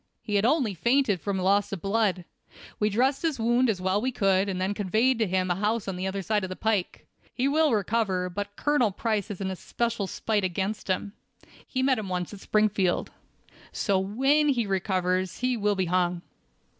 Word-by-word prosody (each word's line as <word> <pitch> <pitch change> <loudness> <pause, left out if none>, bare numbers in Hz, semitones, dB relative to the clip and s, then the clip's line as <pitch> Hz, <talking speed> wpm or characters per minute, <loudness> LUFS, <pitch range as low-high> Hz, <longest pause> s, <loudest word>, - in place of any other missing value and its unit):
He 210 - -5
had 205 +1 +3
only 250 -5 +2
fainted 235 - +1
from 200 -2 -2
loss 195 +2 +2
of 195 - -4
blood. 195 -2 0 0.5
We 210 - +2
dressed 260 +6 +1
his 315 -6 -1
wound 240 +2 +2
as 200 -4 0
well 190 +2 +1
as - - 0
we 260 +2 0
could, 195 -3 +2
and 185 -1 -3
then 190 +2 0
conveyed 220 +5 +1
him 185 -3 +1
to - - +3
a - - -7
house 215 +2 0
the 190 -1 -3
other 195 0 -3
side 210 +1 0
of 185 - -3
the 185 - -5
pike. 210 -4 -1 0.3
He 260 +2 +1
will 305 +1 +3
recover; 205 -3 0
but 205 +3 -5
Colonel 290 -6 +2
Price 210 0 -2
has 205 -2 -7
an 190 -1 -2
especial 225 +2 -2
spite 210 +1 -1
against 190 +3 -2
him. 195 +2 -2 0.5
He 260 -1 -1
met 260 -3 +3
him 200 -3 -5
once 180 +1 -3
at 205 - -9
Springfield. 210 -4 +1 0.6
So, 195 -3 +1
when 270 +10 +2
he 240 -5 +1
recovers 185 -2 -1
he 255 0 0
will 210 -2 +1
be 190 -1 0
hung." 175 0 0
205 Hz, 200 wpm, -27 LUFS, 190-230 Hz, 0.6 s, had